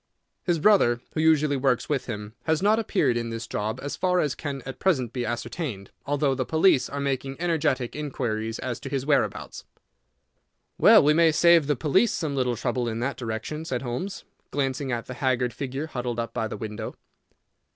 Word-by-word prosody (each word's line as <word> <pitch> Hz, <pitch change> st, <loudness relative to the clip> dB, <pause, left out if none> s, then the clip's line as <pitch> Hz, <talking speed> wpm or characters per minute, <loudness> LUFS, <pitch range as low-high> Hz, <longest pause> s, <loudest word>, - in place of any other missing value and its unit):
His 175 Hz, -2 st, +1 dB
brother, 155 Hz, -, +4 dB
who 155 Hz, -, 0 dB
usually 155 Hz, -3 st, +3 dB
works 130 Hz, -2 st, +1 dB
with 145 Hz, -3 st, -1 dB
him, 105 Hz, -2 st, -6 dB
has 160 Hz, -1 st, +2 dB
not 215 Hz, +2 st, +4 dB
appeared 140 Hz, -, +1 dB
in 115 Hz, -1 st, -2 dB
this 115 Hz, 0 st, -5 dB
job 105 Hz, 0 st, -3 dB
as 145 Hz, -, -3 dB
far 180 Hz, -1 st, +1 dB
as 150 Hz, -5 st, +1 dB
can 140 Hz, -3 st, -5 dB
at 135 Hz, -, -7 dB
present 130 Hz, -, +1 dB
be 125 Hz, -3 st, -2 dB
ascertained, 120 Hz, -, -4 dB, 0.2 s
although 145 Hz, -1 st, +1 dB
the 130 Hz, 0 st, -1 dB
police 160 Hz, -4 st, +3 dB
are 140 Hz, -, -4 dB
making 135 Hz, 0 st, -2 dB
energetic 145 Hz, -8 st, 0 dB
inquiries 115 Hz, -7 st, -3 dB
as 125 Hz, -3 st, -4 dB
to -, -, -7 dB
his 135 Hz, -2 st, -2 dB
whereabouts." 145 Hz, -2 st, 0 dB, 1.2 s
"Well, -, -, +8 dB
we 150 Hz, +1 st, +5 dB
may 165 Hz, 0 st, +5 dB
save 170 Hz, -1 st, +5 dB
the 145 Hz, -, +2 dB
police 160 Hz, -, +2 dB
some 150 Hz, -4 st, -2 dB
little 125 Hz, -2 st, +1 dB
trouble 120 Hz, +1 st, -1 dB
in 115 Hz, 0 st, -3 dB
that 135 Hz, +1 st, -1 dB
direction," 120 Hz, +6 st, -4 dB
said 130 Hz, -5 st, -3 dB
Holmes, 135 Hz, +11 st, -4 dB, 0.3 s
glancing 135 Hz, -1 st, -1 dB
at 120 Hz, -1 st, -2 dB
the 130 Hz, -, -7 dB
haggard 125 Hz, -1 st, 0 dB
figure 135 Hz, +2 st, -4 dB
huddled 125 Hz, -6 st, -4 dB
up 115 Hz, 0 st, -3 dB
by 110 Hz, -, -1 dB
the -, -, -6 dB
window. 110 Hz, -1 st, -6 dB
135 Hz, 190 wpm, -26 LUFS, 120-150 Hz, 1.2 s, Well